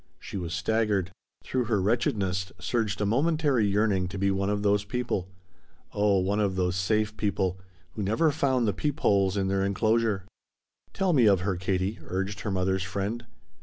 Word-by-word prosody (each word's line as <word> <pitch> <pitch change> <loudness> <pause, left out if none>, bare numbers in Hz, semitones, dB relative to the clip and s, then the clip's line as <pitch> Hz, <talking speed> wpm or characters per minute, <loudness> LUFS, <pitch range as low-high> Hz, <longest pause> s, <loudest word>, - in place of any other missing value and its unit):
She - - -9
was 85 -3 -3
staggered. 100 0 0 0.3
Through 130 -2 -1
her 110 -3 +1
wretchedness 95 -3 0
surged 105 +2 -1
a - - +2
momentary 140 0 +2
yearning 100 -2 +1
to 95 +2 -6
be 100 +1 +1
one 95 +1 0
of 105 0 -1
those 100 0 +2
people 105 -4 -3 0.6
oh, 100 -1 +3
one 100 +3 0
of 100 -3 +1
those 90 -1 0
safe 105 +3 0
people 95 -3 -1 0.3
who 110 - -6
never 110 +11 +2
found 130 -5 +1
the 100 - +1
peep 145 - -3
holes 100 -1 +3
in 95 -1 0
their 95 0 +1
enclosure! 110 0 +1 0.7
"Tell 190 -2 +1
me 125 -7 +5
of 100 -3 +4
her, 95 +1 -1
Katie," 95 +3 -1
urged 95 +2 -3
her - - -3
mother's 95 0 0
friend. 100 +5 -3
100 Hz, 175 wpm, -27 LUFS, 95-110 Hz, 0.7 s, me